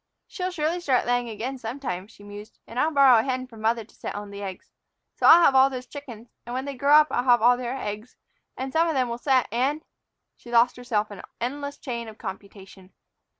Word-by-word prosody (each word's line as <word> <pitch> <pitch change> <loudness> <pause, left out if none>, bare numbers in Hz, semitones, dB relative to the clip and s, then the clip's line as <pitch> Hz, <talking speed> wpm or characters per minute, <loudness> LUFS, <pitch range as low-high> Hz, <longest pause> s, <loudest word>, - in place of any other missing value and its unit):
"She'll 365 -1 -4
surely 340 0 -1
start 265 -7 +1
laying 245 0 0
again 240 +5 -5
some 235 +4 -6
time," 185 -8 -4
she 210 -2 -18
mused, 205 +1 -11
"and 235 - -6
I'll 305 - +3
borrow 275 -6 +6
a - - +3
hen 255 -1 -2
from 225 -4 -14
mother 225 +1 +1
to 215 - -23
set - - -7
on 205 0 -7
the 200 0 -8
eggs. 190 -2 -8 0.4
So - - +1
I'll 340 +1 +9
have 275 - +5
all 265 0 +6
those 255 -1 -6
chickens, 245 -6 -11
and 240 +1 -6
when 260 +1 -3
they 280 - -4
grow 280 +3 +4
up 305 0 +6
I'll 245 - 0
have 245 -2 +5
all 245 +1 +6
their 250 +1 -4
eggs, 210 +1 -6 0.4
and 265 0 -5
some 330 +1 +3
of 320 - -1
them 255 -2 +1
will 235 +1 -4
set, 260 -2 +2
and 270 +7 0 0.3
" - - -57
She 240 - -15
lost 240 +1 +4
herself 220 -4 -2
in 200 - -9
an - - -10
endless 285 +4 -4
chain 235 -3 -5
of 220 -1 -11
computation. 195 -1 -10
245 Hz, 240 wpm, -25 LUFS, 220-275 Hz, 0.4 s, I'll